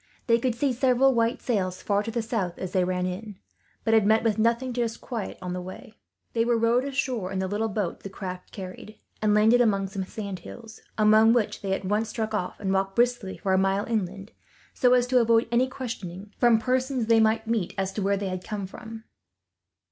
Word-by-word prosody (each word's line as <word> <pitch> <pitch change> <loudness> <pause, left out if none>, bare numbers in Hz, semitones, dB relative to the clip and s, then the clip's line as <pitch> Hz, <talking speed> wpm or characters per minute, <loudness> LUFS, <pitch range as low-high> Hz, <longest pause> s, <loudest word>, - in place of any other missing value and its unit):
They 230 -2 +3
could 245 -1 0
see 265 +2 +1
several 260 +1 +3
white 230 0 0
sails 185 -6 -1
far 205 0 +1
to 215 - -5
the 230 0 -2
south, 205 -6 -2
as 185 - -5
they 185 - +2
ran 180 0 -1
in; 195 +3 -5 0.5
but 225 - +1
had 220 -2 +4
met 220 +1 +4
with 220 -2 +1
nothing 235 +3 +1
to 240 - -1
disquiet 230 -1 -4
them, 185 - -10
on 180 - -3
the 180 - -4
way. 185 +6 -10 0.4
They 230 - +2
were 235 0 +2
rowed 230 +3 +2
ashore 260 -8 -2
in 190 - -3
the 190 0 -1
little 210 +3 -1
boat 200 -4 -2
the 195 - -8
craft 185 -1 -7
carried, 190 +2 -9 0.2
and 210 -1 +3
landed 225 +3 +5
among 195 -4 +2
some 195 0 -4
sand 200 -2 -6
hills; 225 +5 -11 0.2
among 215 +1 +6
which 235 -4 0
they 195 -1 -1
at 190 - -3
once 210 +3 0
struck 220 0 -3
off, 180 -4 -3
and 195 -2 -1
walked 195 0 0
briskly 240 -5 +1
for 190 - -1
a 190 - +4
mile 195 +1 +1
inland, 200 -2 -3 0.4
so 250 0 +4
as 245 -1 +3
to 250 0 +3
avoid 230 0 +3
any 245 +2 +3
questionings, 210 -7 -7
from 240 -2 +5
persons 255 +1 0
they 225 0 +4
might 220 0 +2
meet, 225 -5 -1
as 195 0 -1
to 210 - -3
where 200 +1 +1
they 195 -1 -3
had 185 0 -4
come 205 -2 -4
from. 220 +3 -10
220 Hz, 225 wpm, -26 LUFS, 195-235 Hz, 0.5 s, among